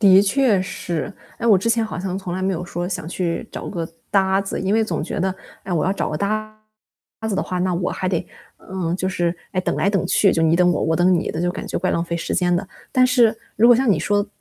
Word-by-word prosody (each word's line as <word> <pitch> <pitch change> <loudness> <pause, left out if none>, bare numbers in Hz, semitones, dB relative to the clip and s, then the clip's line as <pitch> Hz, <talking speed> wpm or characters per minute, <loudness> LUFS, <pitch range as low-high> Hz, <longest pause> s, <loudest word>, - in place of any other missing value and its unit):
的 195 -2 +7
确 215 -2 +3
是， 175 0 -4 0.3
哎， 235 - -2
我 215 -4 +7
之 190 +5 -1
前 230 -1 +2
好 215 - -5
像 185 +1 -3
从 180 -2 -5
来 185 - -3
没 195 - +1
有 180 0 -3
说 175 0 -4
想 170 -4 -4
去 180 +4 -2
找 - - -6
个 170 -4 -4 0.2
搭 190 -1 +3
子， 195 - -4
因 190 +2 +1
为 225 - +3
总 170 -8 -2
觉 160 - -3
得， 190 +1 0 0.3
“哎， 190 - -5
我 160 -3 +1
要 190 - +2
找 200 - -2
个 155 - -2
搭 215 +4 -2 0.7
子 210 - -1
的 - - 0
话， 180 - -3
那 185 0 +1
我 175 +1 -1
还 185 - -2
得 175 -1 -1 0.3
嗯， 180 -3 -3
就 185 0 -1
是， 175 -2 0 0.2
哎， 185 - +1
等 - - -1
来 - - +2
等 200 -3 +1
去” 200 - +4
就 165 - +1
你 160 +1 +4
等 180 0 +4
我、 - - 0
我 160 0 +1
等 175 +2 +4
你 170 - 0
的， 160 - -4
就 175 +1 +1
感 - - -6
觉 - - -2
怪 185 - 0
浪 170 - 0
费 170 0 -3
时 170 - -3
间 180 -1 +2
的。 185 +3 -1 0.3
但 255 0 +5
是 240 -3 +4 0.2
如 230 +3 +6
果 245 - +8
像 250 0 +2
你 185 - +3
说 205 +5 +1
185 Hz, 290 characters per minute, -21 LUFS, 175-205 Hz, 0.7 s, 果